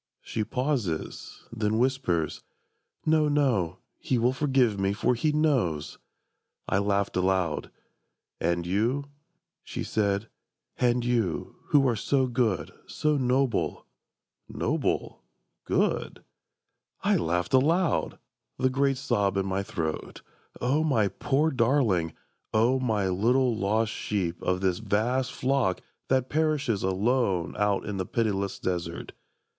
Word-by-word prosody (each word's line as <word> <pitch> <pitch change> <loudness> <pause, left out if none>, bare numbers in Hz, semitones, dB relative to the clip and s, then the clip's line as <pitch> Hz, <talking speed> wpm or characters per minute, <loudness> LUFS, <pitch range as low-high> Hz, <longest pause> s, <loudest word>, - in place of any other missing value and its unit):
She 110 - -2
pauses: 125 - -3
then 110 -1 0
whispers: 115 - 0 0.6
"No, 155 -1 +3
no, 120 - +1 0.2
He 130 - 0
will 120 +2 +2
forgive 130 -6 +2
me, 95 0 +1
for 115 +4 +1
He 150 +6 +1
knows!" 130 - 0 0.7
I 95 - +2
laughed 100 0 0
aloud: 90 -3 0 0.7
"And 85 +1 0
you," 115 +10 0 0.6
she - - -5
said, 100 0 0 0.5
"and 120 -1 +2
you, 115 -8 -1
Who 140 -2 +4
are 120 - +2
so 130 +5 +1
good, 120 -6 0
so 150 0 0
noble"... 130 -2 0 0.6
"Noble? - - -1 0.4
Good?" - - 0 0.8
I - - +3
laughed 90 +1 0
aloud, 160 +5 +2 0.4
the 130 0 +1
great 135 0 +1
sob 100 -8 0
in 95 - +1
my 95 0 -1
throat. 80 -5 -4 0.4
O 140 +5 +1
my 115 -10 +2
poor 145 +8 +1
darling, 115 - +2 0.4
O 120 +4 +3
my 110 -6 0
little 120 +6 +2
lost 110 +1 +1
sheep 90 -5 -2
Of 90 0 0
this 95 -2 +1
vast 115 +5 0
flock 130 -8 0 0.3
that 130 -1 +2
perishes 150 -8 0
alone 95 -2 +1
Out 105 -1 +1
in 105 -2 -4
the 95 - -3
pitiless 100 -4 -1
desert! 85 -2 -3
115 Hz, 120 wpm, -27 LUFS, 95-130 Hz, 0.8 s, Who